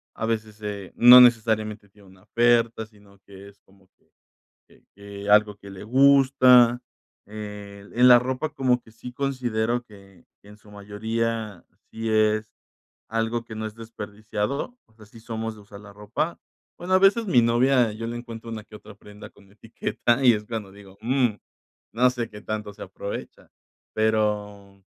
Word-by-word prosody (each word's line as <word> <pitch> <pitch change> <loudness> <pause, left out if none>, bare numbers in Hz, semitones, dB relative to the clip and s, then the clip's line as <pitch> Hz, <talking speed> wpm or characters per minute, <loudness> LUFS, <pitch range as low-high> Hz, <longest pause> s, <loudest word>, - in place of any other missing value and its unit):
a 110 - -4
veces, 110 -2 -4
eh, 100 -2 -6
no 125 +1 +9
necesariamente 110 -3 +2
tiene 100 0 -21
una 95 0 -20
oferta, 115 -1 +1
sino 100 -2 -22
que 100 0 -13
es 100 - -22
como 95 -1 -26
que - - -38 0.6
que - - -24
que 100 0 -9
algo 105 0 +4
que 100 -1 -13
le 95 0 -10
gusta, 130 -1 +5 0.5
eh, 105 -1 -9
en 125 +1 +5
la 125 - +9
ropa 130 +5 -3
como 130 -3 +1
que 110 - -20
sí 115 +2 -10
considero 120 -3 -2
que 100 -5 -19 0.2
que 100 - -18
en 105 - -15
su 105 -1 -20
mayoría 110 0 -4 0.3
sí 115 0 -5
es 110 0 +1 0.6
algo 115 +1 -2
que 115 - -10
no 110 - -4
es 110 - -8
desperdiciado, 110 - -5
o - - -31
sea, 110 -1 -17
sí 115 +2 -16
somos 115 -1 -5
de 105 - -15
usar 100 0 -13
la 105 -1 -14
ropa. 105 +11 -4 0.4
Bueno, 180 +2 -2
a - - +6
veces 200 +4 +3
mi 165 -11 +4
novia, 120 0 +2
yo 115 +2 -6
le 120 - -5
encuentro 115 -1 -9
una 110 -1 -6
que 105 - -13
otra 105 0 -14
prenda 105 +1 -14
con 100 -1 -23
etiqueta 115 +3 -2
y 125 - +7
es 105 0 -5
cuando 110 -3 -6
digo: 100 -1 -16
"Mm, 125 -1 +1 0.6
no 125 +2 +3
sé 120 -2 -5
qué 105 -1 -11
tanto 105 -1 -5
se - - -12
aprovecha", 100 +2 -8 0.5
pero 105 -2 -2
110 Hz, 175 wpm, -24 LUFS, 105-120 Hz, 0.6 s, no